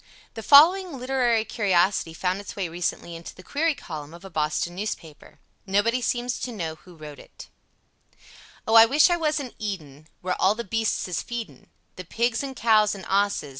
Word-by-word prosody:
The 225 - -7
following 325 - +6
literary 250 -3 +1
curiosity 190 -6 +1
found 185 +3 -2
its 205 - -9
way 195 -3 -2
recently 170 0 -4
into 165 0 -10
the 185 - -14
query 315 - 0
column 155 - -8
of 175 +3 -14
a 195 - -10
Boston 155 +3 -1
newspaper. 175 -6 -7 0.3
Nobody 215 +6 +1
seems 245 0 -2
to 250 - -4
know 170 -8 -4
who 175 +2 -17
wrote 150 -2 -11
it: - - -14 1.2
O 220 - 0
I 225 0 +9
wish 295 +8 +4
I 345 - +2
was 310 -2 0
in 260 -4 -7
eden 155 -9 -6
Where 180 0 -2
all 195 +3 +4
the 235 - -5
beastes 225 0 -1
is 180 - -2
feedin, 240 -3 -7 0.3
the 185 - -6
Pigs 230 +5 -1
an 270 -1 -6
cows 215 -3 +3
an 190 -3 -10
osses. 200 -6 0
205 Hz, 185 wpm, -24 LUFS, 175-240 Hz, 1.2 s, I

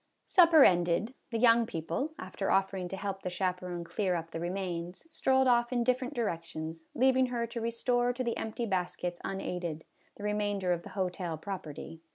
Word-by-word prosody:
Supper 335 -5 +7
ended, 175 +6 +3 0.2
the 230 - -1
young 230 0 +5
people, 170 - -3
after 185 +1 -4
offering 195 -1 +1
to 195 - -5
help 195 0 -4
the 180 - -3
chaperon 180 -1 -2
clear 185 +1 -1
up 165 -1 -4
the 165 - -4
remains, 175 - -4
strolled 265 -2 +3
off 240 -1 +3
in 240 -1 +1
different 255 +3 0
directions, 165 -6 -3
leaving 260 +1 +4
her 240 -1 -1
to 235 0 -5
restore 245 +1 +1
to 250 +1 -3
the 235 -2 -1
empty 220 +2 -3
baskets 180 -3 -2
unaided, 180 -4 -4 0.3
the 205 - -9
remainder 205 -3 0
of 170 - -3
the 205 - -10
hotel 180 -3 -2
property. 165 -2 -7
195 Hz, 175 wpm, -31 LUFS, 175-235 Hz, 0.3 s, Supper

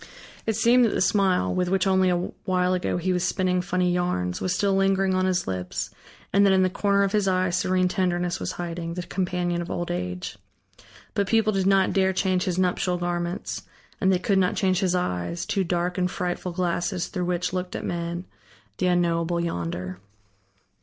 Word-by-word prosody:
It 220 - +1
seemed 235 +3 +5
that 220 - 0
the - - 0
smile, 190 -2 +2
with 180 -1 0
which 190 0 +2
only 190 -1 +3
a 175 - +2 0.3
while 180 -1 +2
ago 180 -1 -1
he 185 +1 0
was 180 -1 0
spinning 180 -1 +1
funny 180 -1 0
yarns, 135 - -1
was 185 - 0
still 195 +2 +1
lingering 195 0 +2
on 185 0 +2
his 180 -1 0
lips, 90 -1 -4 0.4
and 200 +1 +5
that 195 -1 +5
in 190 0 +4
the 185 - +1
corner 200 +1 +2
of 195 - 0
his 210 -2 +1
eye 185 -1 +2
serene 185 +1 +2
tenderness 180 -1 0
was - - -3
hiding, 170 -1 -5
the 180 - -3
companion 180 -1 -1
of 170 - -6
old 175 - -3
age. 90 +3 -4 0.7
But 200 -2 0
people 215 +1 +3
did 195 -1 +1
not 195 -1 +3
dare 190 -1 +2
change 185 -1 +1
his 180 -1 -1
nuptial 180 -1 +1
garments, 175 +1 -3 0.4
and 190 - +4
they 185 - +3
could 190 +2 +1
not 180 -1 +2
change 185 -3 +2
his 185 -2 +1
eyes, 170 - -2
two 195 - 0
dark 175 +1 -1
and 180 0 +1
frightful 180 -1 -3
glasses 175 0 -1
through 180 -3 -2
which 180 0 -1
looked 180 0 -3
at - - -4
men, 170 +1 -3 0.5
the 185 - +2
unknowable 170 -1 +1
Yonder. 90 - -3
180 Hz, 195 wpm, -25 LUFS, 175-190 Hz, 0.7 s, seemed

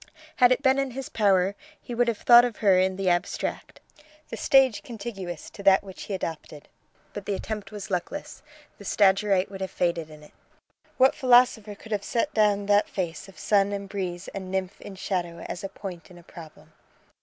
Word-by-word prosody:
Had 250 -1 +6
it 255 +3 +1
been 265 0 +4
in 275 -1 -1
his 270 - -5
power 195 -3 +2 0.3
he 245 - -8
would 240 +1 +1
have 230 -2 0
thought 240 +2 +7
of 245 -3 -2
her 195 -4 +4
in 190 0 +1
the 195 0 -3
abstract 175 -1 -2 0.5
the - - -5
stage 260 -6 +3
contiguous 200 -7 -7
to - - -11
that 195 0 +5
which 190 -2 -10
he 200 - -3
adopted: 160 -4 -7 0.5
but 205 - -7
the 200 - 0
attempt 210 +1 -6
was 205 -2 -8
luckless; 185 +11 -4 0.4
the - - -11
Stagyrite 195 -1 +2
would 195 -1 -8
have 190 - -3
faded 170 -2 -1
in 155 -1 -14
it. 150 - -16 0.7
What 260 +1 +5
philosopher 245 -5 +3
could 220 +2 -14
have 205 -2 -1
set 255 +8 -1
down 205 -2 +2
that 205 0 +3
face 180 0 -4
of 190 - -17
sun 200 -1 +2
and 200 -1 -4
breeze 185 -2 -5
and 190 -2 -7
nymph 190 0 -3
in 200 - -9
shadow 175 -3 -4
as 175 - -6
a 195 - -4
point 180 -5 -9
in 180 - -14
a 175 - -15
problem? 165 -2 -14
200 Hz, 200 wpm, -26 LUFS, 185-220 Hz, 0.7 s, thought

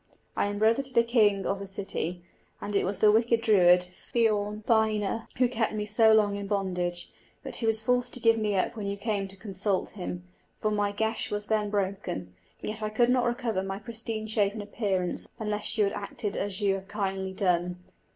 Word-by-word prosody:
I - - +1
am 205 0 -3
brother 225 +5 +3
of 265 -2 -6
the 235 - +6
king 215 -4 +3
of 195 - -1
the 200 - -6
city; 185 -2 -4 0.4
and 205 - -5
it - - +2
was 190 +1 -1
the 210 - +5
wicked 230 +1 +3
Druid, 180 -5 +5
Fionn 210 +2 -1
Badhna, 220 -1 +1
who 250 0 +4
kept 230 -3 -1
me 210 -1 -2
so 220 +1 +5
long 210 -2 +4
in 200 0 -5
bondage; 180 -3 -2 0.3
but - - -4
he 230 - -1
was 220 0 +2
forced 245 +2 +1
to - - -7
give 230 -1 +4
me 215 -2 0
up 185 - 0
when 210 -3 -4
you 200 0 -3
came 200 -2 -2
to 195 - -14
consult 195 -1 -2
him, 90 0 -6 0.3
for 215 - -1
my 205 -1 +1
geis 220 +2 -1
was 205 0 -3
then 210 -1 0
broken; 195 - -3 0.3
yet 215 +1 -5
I 215 - -1
could 240 +3 +3
not 250 -1 +3
recover 235 -4 -1
my 195 0 -4
pristine 225 0 -4
shape 210 -2 +1
and 215 -1 -5
appearance 200 -4 0
unless 210 0 -1
you 215 - +4
had 200 - 0
acted 205 0 -4
as 200 0 -2
you 200 -1 +3
have 195 0 -5
kindly 195 -2 -3
done. 180 -2 0
210 Hz, 210 wpm, -28 LUFS, 195-220 Hz, 0.4 s, the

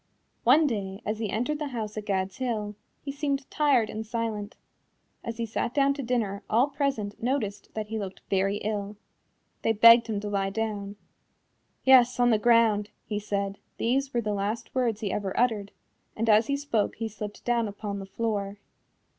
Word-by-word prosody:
One 315 +1 +6
day 200 -7 -2
as 215 +1 -2
he 220 -2 -2
entered 250 +9 -1
the 300 - -2
house 220 -5 -4
at 215 -1 -6
Gad's 190 -1 -1
Hill, 220 -5 -2 0.3
he 280 - -4
seemed 280 -1 -2
tired 280 -7 +3
and 215 +1 -5
silent. 220 -1 -3 0.7
As 230 -1 -5
he 230 - -1
sat 225 +2 -3
down 280 -1 +4
to 280 - -5
dinner 230 -6 -1
all 245 +6 +3
present 275 -8 -2
noticed 230 -5 -2
that 215 -1 -4
he 220 0 -2
looked 195 -2 -6
very 195 +1 +1
ill. 205 -1 -3 0.6
They 225 - +2
begged 230 +2 +8
him 215 -3 -1
to 210 - -4
lie 195 -1 0
down. 205 -1 -3 0.9
"Yes, 250 -2 +6
on 245 0 +5
the 220 - +3
ground," 220 -2 +4 0.2
he 210 -1 -2
said 200 -1 -3 0.2
these 270 +4 0
were 240 - 0
the 210 -2 -2
last 205 +3 -3
words 240 -4 0
he 205 -3 -1
ever 195 -1 -2
uttered 220 -5 +1 0.4
and 225 +1 -1
as 215 +1 +5
he 280 - 0
spoke 260 -7 0
he 225 - -3
slipped 210 -1 -8
down 235 -2 +1
upon 205 0 -5
the 195 - -7
floor. 205 -2 -2
220 Hz, 185 wpm, -27 LUFS, 205-245 Hz, 0.9 s, begged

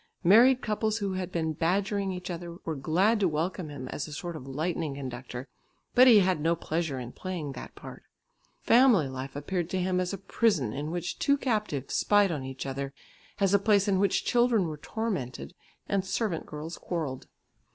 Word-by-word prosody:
Married 240 +8 +6
couples 215 0 0
who 200 -3 -2
had 185 -1 -3
been 160 -2 -1
badgering 195 +4 0
each 180 0 -5
other, 170 0 -6
were 160 - -1
glad 180 +11 +2
to 195 - +3
welcome 165 +1 -2
him 135 -3 -7
as 145 - -4
a - - -10
sort 170 +3 -5
of 135 -4 -8
lightning 155 +1 -2
conductor, 130 -1 -6 0.5
but 255 +1 +7
he 220 -5 +8
had 185 -4 +1
no 165 +2 +2
pleasure 160 -3 -2
in 120 -1 -6
playing 175 -5 -5
that 130 - -9
part. - - -10 0.6
Family 235 - +5
life 130 +1 -6
appeared 170 +4 -2
to 190 - -1
him 180 0 +1
as 180 -1 -1
a 200 - -3
prison 190 - +1
in 145 +2 -4
which 175 +1 -4
two 280 0 +3
captives 210 - -2
spied 205 -2 +4
on 145 -5 -3
each 130 0 -6
other, 135 +1 -4 0.4
as 195 -1 +2
a 200 - +6
place 200 0 +3
in 195 -2 +2
which 200 -1 +1
children 240 -5 +3
were 155 -1 -5
tormented, 150 - -4 0.3
and 195 -1 0
servant 190 -3 -2
girls 155 +3 -7
quarrelled. 155 -7 -4
175 Hz, 190 wpm, -28 LUFS, 145-200 Hz, 0.6 s, he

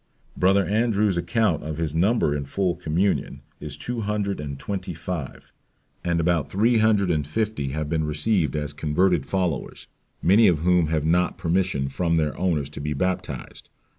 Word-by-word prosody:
"Brother 95 +1 +3
Andrew's 105 -1 +1
account 105 0 +1
of 75 -1 -5
his 80 -3 -2
number 90 -2 +2
in 70 -1 -3
full 90 +5 -1
communion 90 +6 -1 0.2
is 75 -2 -6
TWO 120 -1 -4
HUNDRED 105 -3 -2
AND 70 -2 -5
TWENTY 90 +3 -5
FIVE, 80 -4 -6 0.5
and 85 -1 0
about 85 -2 +1
THREE 115 +4 +3
HUNDRED 105 -4 +3
AND 75 -3 -1
FIFTY 105 -4 -2
have 75 0 -2
been 80 0 0
received 75 - 0
as 75 -1 -3
converted 75 0 +1
followers, 90 -7 -2 0.3
many 105 +5 +5
of 85 -4 +4
whom 90 -2 +3
have 80 -1 0
not 90 +2 +2
permission" 90 -5 0
from 85 +5 0
their 75 -3 0
owners 80 -6 -1
"to - - -8
be 75 +1 -2
baptized. 90 +5 -4
85 Hz, 165 wpm, -24 LUFS, 75-100 Hz, 0.5 s, many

